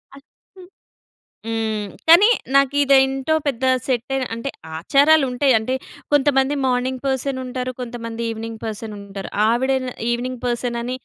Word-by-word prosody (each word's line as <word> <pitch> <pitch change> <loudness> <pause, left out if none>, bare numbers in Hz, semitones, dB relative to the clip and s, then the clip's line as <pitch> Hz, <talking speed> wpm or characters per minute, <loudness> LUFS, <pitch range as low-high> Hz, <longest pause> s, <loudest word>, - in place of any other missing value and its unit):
ఆ! - - -13 0.4
హ్మ్. 365 -1 -13 0.8
హ్మ్. 220 -2 -2 0.2
కానీ 345 +6 +8 0.3
నాకు 275 0 +3
ఇది 280 -1 +4
ఏంటో 270 +3 0
పెద్ద 260 -2 -2 0.2
సెట్టయి 265 +1 -1
అంటే 230 +4 -4 0.3
ఆచారాలుంటాయి. 275 - +3
అంటే 220 +4 -2 0.4
కొంతమంది 280 -1 +3
మార్నింగ్ 255 0 -1
పర్సనుంటారు. 260 -1 -2
కొంతమంది 235 -1 -6
ఈవినింగ్ 225 0 -6
పర్సనుంటారు. 205 -3 -7 0.2
ఆవిడే 260 +4 +2
న - - -3 0.2
ఈవినింగ్ 245 +1 -3
పర్సనని 240 0 -2
255 Hz, 120 wpm, -21 LUFS, 230-270 Hz, 0.8 s, కానీ